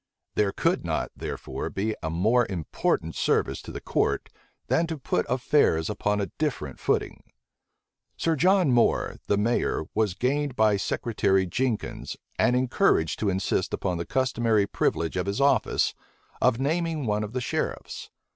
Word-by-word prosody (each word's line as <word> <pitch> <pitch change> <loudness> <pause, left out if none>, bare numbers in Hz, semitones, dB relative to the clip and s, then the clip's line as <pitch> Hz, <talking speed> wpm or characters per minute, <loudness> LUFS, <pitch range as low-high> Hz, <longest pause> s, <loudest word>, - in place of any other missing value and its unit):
There 105 -2 +2
could - - 0
not, - - -2
therefore, - - -5
be 110 +3 -2
a 80 - -2
more 110 +9 +2
important 80 -2 -1
service - - 0
to - - -9
the - - -6
court - - 0 0.4
than 165 +1 +1
to 160 -1 -4
put 90 -9 -1
affairs 120 - +2
upon 105 0 0
a 100 - -3
different 120 - -2
footing. - - -1 1.0
Sir 165 -1 +1
John 180 0 +4
Moore, 120 -1 +2
the 100 - +2
mayor, 110 -5 +1
was 105 -5 +1
gained 140 +3 0
by 110 -3 +4
Secretary 95 -2 +1
Jenkins, 120 +5 -2 0.2
and 125 - +4
encouraged 125 -10 +2
to 105 - +1
insist 95 -1 0
upon 90 -3 -2
the 85 - -3
customary 120 -5 +2
privilege 85 -3 -1
of 90 +1 -1
his 100 +4 -1
office, 140 0 +2 0.5
of 115 - +3
naming 160 +1 0
one 105 -1 0
of 105 +2 -6
the 130 - -1
sheriffs. - - -3
110 Hz, 155 wpm, -26 LUFS, 95-130 Hz, 1.0 s, John